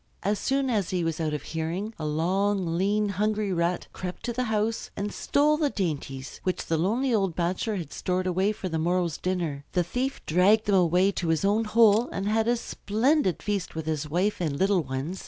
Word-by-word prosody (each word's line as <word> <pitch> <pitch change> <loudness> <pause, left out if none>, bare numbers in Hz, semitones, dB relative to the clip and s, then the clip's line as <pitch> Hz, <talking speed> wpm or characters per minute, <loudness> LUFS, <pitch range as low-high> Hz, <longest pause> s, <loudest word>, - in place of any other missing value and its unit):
As 205 +1 0
soon 270 +1 0
as 205 -6 0
he 180 -2 0
was 165 -1 -2
out 160 -2 0
of 150 - -5
hearing 170 +7 -3
a 155 - -2
long, 180 +3 0
lean, 205 +3 +1
hungry 210 0 0
Rat 170 +1 0
crept 180 -1 -6
to 240 0 -2
the 250 +2 -1
house 220 0 -1
and 205 +1 -3
stole 300 +1 +2
the 300 -2 +1
dainties 145 - -4
which 185 -1 -2
the 165 - 0
lonely 235 +9 +1
old 195 -6 +1
bachelor 185 +5 -1
had 170 -7 -5
stored 185 0 -1
away 185 +3 +1
for 200 -3 -5
the 165 -2 -2
morrow's 175 -1 0
dinner. 170 -6 -2
The 180 - +2
thief 255 +9 -2
dragged 200 +7 +4
them 205 - +1
away 180 +1 +4
to 180 -3 -3
his 160 +3 +1
own 210 +3 +2
hole 225 +1 +4
and 195 +1 -3
had 220 +1 +1
a 240 0 +3
splendid 230 - 0
feast 200 -5 -2
with 160 -1 -4
his 155 -1 -2
wife 180 +6 0
and 150 -5 -1
little 190 0 +3
ones. 140 +6 -4
190 Hz, 210 wpm, -27 LUFS, 170-215 Hz, -, dragged